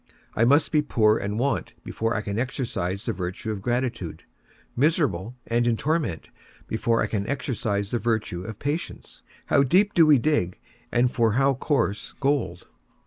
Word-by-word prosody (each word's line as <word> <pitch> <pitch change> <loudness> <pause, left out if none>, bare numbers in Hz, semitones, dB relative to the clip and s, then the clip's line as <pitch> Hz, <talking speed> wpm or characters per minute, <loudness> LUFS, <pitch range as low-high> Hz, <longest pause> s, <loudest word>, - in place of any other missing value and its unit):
I 115 - +3
must 145 +5 +4
be 155 -2 +4
poor 110 -6 +3
and 100 +1 -3
want 135 +4 -1
before 115 +1 -2
I 105 - 0
can 100 +1 -3
exercise 115 -6 -3
the 115 - -1
virtue 90 +4 -4
of 105 -2 -5
gratitude; 120 -5 -2 0.5
miserable, 125 - +1
and 120 +1 +1
in 115 -1 +2
torment, 150 - -1 0.3
before 115 +1 +1
I - - +1
can 100 -2 -2
exercise 110 -7 -2
the 120 - 0
virtue 110 -7 -1
of 110 +1 -7
patience. 150 +4 -5 0.2
How 140 - +3
deep 190 +10 +3
do 165 -2 +6
we 150 -2 +7
dig, 120 - 0 0.3
and 120 +1 +2
for 115 -3 +2
how 135 +3 +3
coarse 125 -6 -1
gold! 140 -11 0
120 Hz, 165 wpm, -25 LUFS, 105-140 Hz, 0.5 s, we